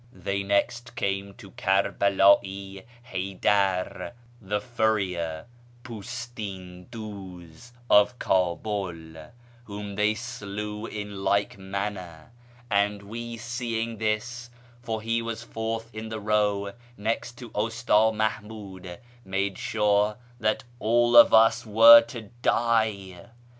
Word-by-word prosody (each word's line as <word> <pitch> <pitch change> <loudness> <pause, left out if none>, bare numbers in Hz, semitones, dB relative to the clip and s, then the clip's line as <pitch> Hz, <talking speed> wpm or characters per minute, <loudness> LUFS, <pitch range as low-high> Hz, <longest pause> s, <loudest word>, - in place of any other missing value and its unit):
" - - -28
They 100 0 0
next 100 +5 -1
came 100 0 -2
to 100 -5 -13
Kerbela'i 100 -2 +2 0.3
Ilaydar, 95 +1 0 0.3
the 105 +1 -2
furrier 100 -8 -1 0.4
(jnlsHn 105 -6 -7
cluz), 100 -3 -10 0.2
of 105 +4 +5
Kabul, 90 -5 -2 0.3
whom 105 -1 -7
they 105 +2 +1
slew 105 -2 -6
in 105 -2 -6
like 100 0 +1
manner; 95 -2 -5 0.4
and 100 0 +1
we, 115 +3 -7
seeing 115 -1 -3
this 115 +3 -2 0.3
(for 110 -3 -4
he 115 +1 0
was 115 0 -5
fourth 115 0 -5
in 110 0 -6
the 110 -1 -4
row, 105 -1 0 0.2
next 115 +3 -2
to 120 -3 -10
Usta 115 +3 -1 0.2
Mahmiid), 105 -4 -4 0.3
made 95 0 -2
sure 105 0 +1 0.2
that 110 -1 0 0.2
all 120 +2 +3
of 120 - +9
us 115 +1 +5
were 115 +2 +9
to 115 -2 -9
die. 110 -8 0
105 Hz, 110 wpm, -26 LUFS, 100-115 Hz, 0.4 s, of